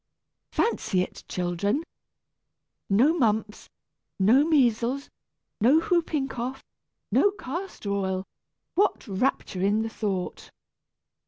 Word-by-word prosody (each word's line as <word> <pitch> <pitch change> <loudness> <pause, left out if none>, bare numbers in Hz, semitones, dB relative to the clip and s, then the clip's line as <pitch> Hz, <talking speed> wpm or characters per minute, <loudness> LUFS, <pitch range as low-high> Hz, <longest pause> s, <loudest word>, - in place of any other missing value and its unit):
Fancy 190 - +1
it, - - -9
children! 180 - -1 1.1
No 240 +11 +5
mumps, 220 -8 0 0.5
no 230 +9 +5
measles, 265 -3 +2 0.5
no 260 +9 +5
whooping 325 -5 0
cough, 260 +1 -5 0.5
no 410 - +5
castor 350 - -5
oil! 190 -1 -1 0.5
What 400 -7 +1
rapture 195 -2 -1
in 205 +3 +2
the 225 - -3
thought! 200 -5 -3
235 Hz, 95 wpm, -26 LUFS, 200-290 Hz, 1.1 s, No